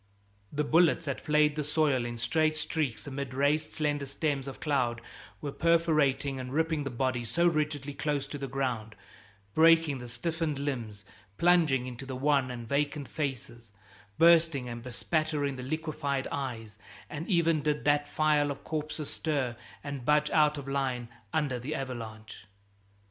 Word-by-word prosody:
The 150 +1 0
bullets 165 +2 +4
that 140 -2 -3
flayed 150 -1 +3
the 150 - -1
soil 145 -4 +1
in 120 0 -4
straight 155 +7 +1
streaks 155 -5 -2
amid 140 -2 -5
raised 150 +3 +1
slender 145 -2 -1
stems 140 -1 -1
of 135 - -7
cloud 130 -6 0 0.4
were 145 - -3
perforating 155 -5 +2
and 130 0 -6
ripping 160 0 +1
the - - -1
bodies 125 -2 -1
so 170 +1 +2
rigidly 150 -4 0
close 145 -1 -1
to 145 - -5
the 135 - -3
ground, 125 -5 -2 0.6
breaking 165 -3 +5
the 125 - -8
stiffened 155 +5 -2
limbs, 115 -8 -4 0.3
plunging 165 -7 +4
into 125 +1 -7
the 130 - -4
wan 140 0 +2
and 120 -2 -6
vacant 145 +2 -1
faces, 130 -6 -5 0.4
bursting 165 -6 +5
and 120 -1 -6
bespattering 145 +3 -1
the 130 - -6
liquefied 145 -1 -2
eyes; 115 -6 -5 0.3
and 155 +3 -6
even 165 -4 +3
did 150 0 -1
that 145 0 +3
file 150 -1 +2
of 140 - -5
corpses 155 -1 -4
stir 140 -6 -1 0.3
and 140 -3 -5
budge 150 +2 +3
out 150 -1 +4
of 140 -1 -7
line 130 -4 -1 0.2
under 145 -5 0
the 145 +6 -4
avalanche. 110 -6 -7
145 Hz, 155 wpm, -30 LUFS, 130-155 Hz, 0.6 s, breaking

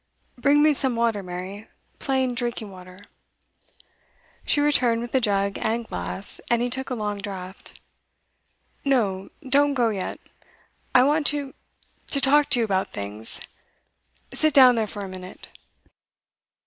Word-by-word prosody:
'Bring 285 +4 +3
me 305 0 +5
some 265 -3 +3
water, 230 -3 +1
Mary, 185 +4 -7 0.3
plain 265 -2 0
drinking 235 -3 -2
water.' 185 0 -12 1.5
She - - +2
returned 255 -6 +3
with 240 0 -6
a 265 - +3
jug 200 -2 0
and 230 +1 -1
glass, 90 - -5
and 235 - +3
he 245 - -2
took 265 +2 -3
a 250 - -2
long 210 -2 -3
draught. 190 -2 -8 1.0
'No, 205 -9 0 0.2
don't 285 +2 +3
go 240 -3 +2
yet. 195 -4 -4 0.8
I 250 - +8
want 295 +2 +3
to 285 -2 -1 0.5
to 280 - +2
talk 290 +2 +4
to 245 - +2
you 230 - +2
about 190 -2 -1
things. 105 +2 -5 0.9
Sit 310 -1 +2
down 255 -3 +9
there 225 -2 0
for 205 -1 -6
a - - -7
minute. 185 0 -10
230 Hz, 145 wpm, -24 LUFS, 195-265 Hz, 1.5 s, down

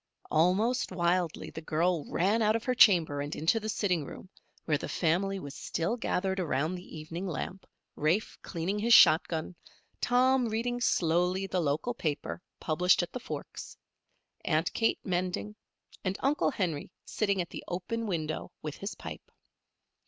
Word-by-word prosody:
Almost 195 +11 +2
wildly 175 -1 0
the 160 - -7
girl 165 +1 0
ran 205 +6 +2
out 215 0 +3
of 230 - -1
her 255 - +1
chamber 170 - +5
and 145 +1 -4
into 165 +9 +2
the 215 0 -5
sitting 180 -7 0
room, 180 - -10 0.4
where 150 -3 +1
the - - -5
family 190 +4 +1
was 140 -6 -7
still 170 +9 -2
gathered 190 -5 -1
around 155 -1 0
the 180 -2 -8
evening 165 +5 -5
lamp, 180 +3 -5 0.3
Rafe 165 +8 0
cleaning 185 +4 -3
his 235 +3 +6
shot 155 +1 +7
gun, 165 +1 -4 0.5
Tom 255 0 +3
reading 240 +2 -1
slowly 180 -2 +2
the 185 -2 -1
local 155 +11 0
paper, 155 -4 -3 0.2
published 175 +3 +3
at 175 - -6
the 250 - -3
Forks, 250 - -7 0.7
Aunt 160 +1 +1
Kate 225 - +2
mending, 185 +3 -2 0.5
and 190 0 -1
Uncle 280 +3 +2
Henry 175 - -2 0.2
sitting 200 -3 0
at 170 -1 -3
the - - -7
open 220 +6 -3
window 155 -5 -3
with 150 -2 -5
his 200 +3 -5
pipe. - - -9
180 Hz, 160 wpm, -30 LUFS, 160-215 Hz, 0.7 s, shot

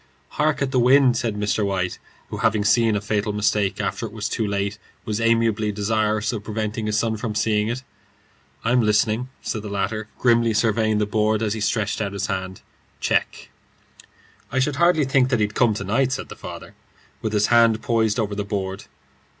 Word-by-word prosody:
"Hark 150 -1 0
at 135 - -2
the 130 - +2
wind," 130 0 +5
said 115 -3 -1
Mr. 105 +1 0
White, 95 -2 -1 0.3
who, - - -4
having 110 -2 +1
seen 115 0 +3
a 100 - -1
fatal 105 0 -1
mistake 105 -1 0
after 115 - -2
it - - -12
was 105 0 -4
too 110 -3 -2
late, 100 +1 -2 0.3
was 110 +1 -2
amiably 115 -2 +2
desirous 110 +1 0
of 105 -2 -5
preventing 110 0 -3
his 105 - 0
son 110 -1 0
from 110 -1 -4
seeing 105 -1 +1
it. 120 +3 -3 0.8
"I'm 125 +2 +3
listening," 110 +3 +1
said 110 - -3
the 105 - -7
latter, 105 +2 -2
grimly 115 -2 +3
surveying 110 -1 +2
the 105 - +1
board 110 +1 +1
as 105 -2 0
he 110 - -4
stretched 110 0 0
out 100 -2 -2
his 100 -1 -2
hand. 95 0 -4 0.4
"Check." - - -1 1.0
"I 130 - -2
should 135 +1 +1
hardly 170 -2 +4
think 130 -1 +2
that 125 -4 +1
he'd 105 0 0
come 115 -3 +2
to 100 - -4
night," 125 +7 +1
said 130 - -5
his - - -10
father, - - -9 0.5
with 110 - -2
his 105 0 +3
hand 115 -1 +4
poised 115 -1 +1
over 105 -2 -1
the 100 0 -2
board. 95 -1 -4
110 Hz, 195 wpm, -22 LUFS, 105-115 Hz, 1.0 s, wind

